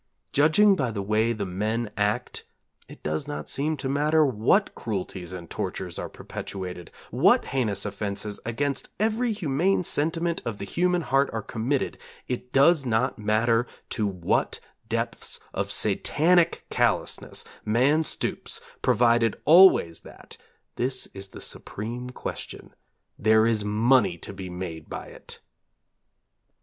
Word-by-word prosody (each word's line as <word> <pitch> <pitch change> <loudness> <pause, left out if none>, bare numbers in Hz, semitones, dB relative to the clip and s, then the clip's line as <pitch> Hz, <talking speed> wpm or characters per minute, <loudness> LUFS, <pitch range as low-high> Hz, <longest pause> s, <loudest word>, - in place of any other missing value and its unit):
Judging 160 +8 +5
by 135 -9 0
the 105 -3 -3
way 110 +3 +2
the 105 -3 -2
men 105 +4 -2
act 105 +4 -1 0.4
it - - -14
does 75 - -2
not 145 - -5
seem 150 +3 -1
to 135 - -3
matter 150 +3 +3
what 130 - +2
cruelties 95 -4 -5
and 90 -2 -7
tortures - - -4
are - - -4
perpetuated; 90 -3 -7 0.2
what - - +4
heinous 115 -8 0
offenses 100 0 -4
against 140 +5 -2
every 225 +3 +1
humane 180 0 +1
sentiment 165 +2 -1
of 115 -3 -4
the 100 - -5
human 175 - +1
heart 135 -1 +2
are 110 -2 -3
committed; 125 +6 -2 0.3
it 125 0 -4
does 140 +3 +5
not 125 +1 0
matter 115 +3 +2 0.2
to 105 -2 0
what 90 -4 0 0.3
depths 115 +1 -2
of - - -2
Satanic 170 +2 +2
callousness - - 0 0.2
man 130 +8 +3
stoops 160 - -2 0.2
provided 120 -2 +3
always 160 - +6
that - - -12 0.4
this 130 +1 0
is 95 0 -7
the - - -11
supreme 120 +4 -5
question 125 - -7 0.5
there 110 +1 +5
is 110 -2 +1
money 105 -2 +3
to 95 - -8
be 95 -1 -7
made 90 -3 -6
by - - -6
it. - - -9
115 Hz, 135 wpm, -26 LUFS, 105-145 Hz, 0.5 s, always